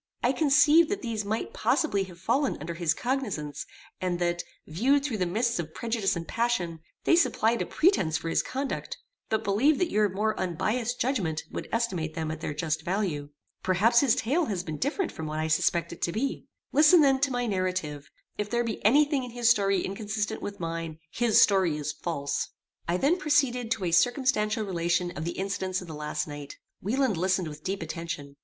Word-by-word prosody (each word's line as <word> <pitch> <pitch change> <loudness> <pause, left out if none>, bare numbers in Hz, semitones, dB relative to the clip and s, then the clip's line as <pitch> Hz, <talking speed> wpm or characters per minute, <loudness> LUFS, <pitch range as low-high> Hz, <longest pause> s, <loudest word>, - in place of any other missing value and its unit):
I 245 - +4
conceived 300 +3 +5
that 405 - -3
these 225 -3 -2
might 220 - -3
possibly 205 - +1
have 175 -2 -13
fallen 265 +9 +1
under 165 +3 -5
his 165 -1 0
cognizance, 210 - -3 0.3
and 180 -1 0
that, 175 0 -1 0.2
viewed 265 - +2
through 235 -8 -2
the 180 - +1
mists 230 +4 0
of 160 -2 -5
prejudice 225 -5 0
and 165 -1 -5
passion, 205 -9 -1 0.2
they - - +5
supplied 235 -9 +2
a - - -2
pretence 250 - +2
for 165 - -6
his 165 - +2
conduct, 270 +1 -4 0.3
but 220 - 0
believed 255 +10 +3
that 360 - 0
your 210 -1 +3
more 210 +3 0
unbiassed 220 +7 -1
judgment 190 - -1
would - - -6
estimate 185 -9 -1
them 160 -1 -2
at 160 0 -6
their - - -3
just 155 0 -2
value. 175 -7 -2 0.3
Perhaps 210 +6 +4
his 265 -4 +4
tale 300 +9 +1
has 195 -8 -2
been 155 -2 -5
different 330 +6 -1
from 160 - -6
what 155 0 -4
I 155 0 -1
suspect 170 +2 +1
it - - -13
to 170 - 0
be. 265 +9 -3 0.2
Listen 310 +3 +7
then 270 -2 +4
to 280 +1 +2
my 245 -1 -1
narrative. 185 -8 -2 0.3
If 210 0 -2
there 240 +2 +1
be 230 -2 -4
any 280 +8 +6
thing 285 -3 -1
in 250 - -6
his 240 0 +3
story 195 -4 +2
inconsistent 210 +2 -3
with 200 0 -6
mine, 165 -2 -4
his 235 -2 +3
story 185 -6 +4
is 150 0 -3
false." 145 -5 -3 0.4
I 170 +1 +1
then 310 - +2
proceeded 275 -8 +1
to 210 -5 -1
a 170 - 0
circumstantial 220 +2 +2
relation 175 -1 0
of 155 - -4
the 170 - -4
incidents 190 -1 -2
of 180 - -9
the 160 - -7
last 150 +1 -3
night. 145 -1 -8 0.2
Wieland 245 0 +1
listened 185 0 +1
with 150 0 -9
deep 195 -2 -2
attention. 160 -3 -6
200 Hz, 200 wpm, -27 LUFS, 170-245 Hz, 0.4 s, Listen